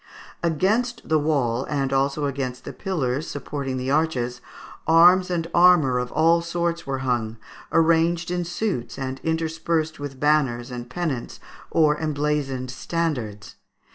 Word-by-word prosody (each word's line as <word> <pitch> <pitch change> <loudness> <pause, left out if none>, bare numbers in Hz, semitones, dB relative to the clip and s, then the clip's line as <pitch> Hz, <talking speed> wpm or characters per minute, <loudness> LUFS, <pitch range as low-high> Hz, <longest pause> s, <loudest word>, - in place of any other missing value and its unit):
Against 200 +9 0
the 155 -1 +3
wall, 135 -5 0
and 135 -2 -1
also 140 +2 +1
against 135 -2 -3
the 140 - -6
pillars 145 -4 -2
supporting 140 -2 -4
the 130 +1 -2
arches, 130 -5 0 0.5
arms 180 +3 +6
and 170 -2 -1
armour 170 -8 +5
of 125 0 -4
all 165 +1 +4
sorts 170 -1 -2
were 135 -1 -1
hung, 115 -3 -1 0.3
arranged 165 +1 +2
in 180 0 -1
suits, 170 - -3
and 130 0 -4
interspersed 160 -1 -1
with 140 -2 -7
banners 135 -5 +1
and 120 0 -7
pennants 145 -6 -3 0.3
or 150 -2 +3
emblazoned 145 -4 -1
standards. 130 -10 -3
150 Hz, 135 wpm, -24 LUFS, 130-165 Hz, 0.5 s, arms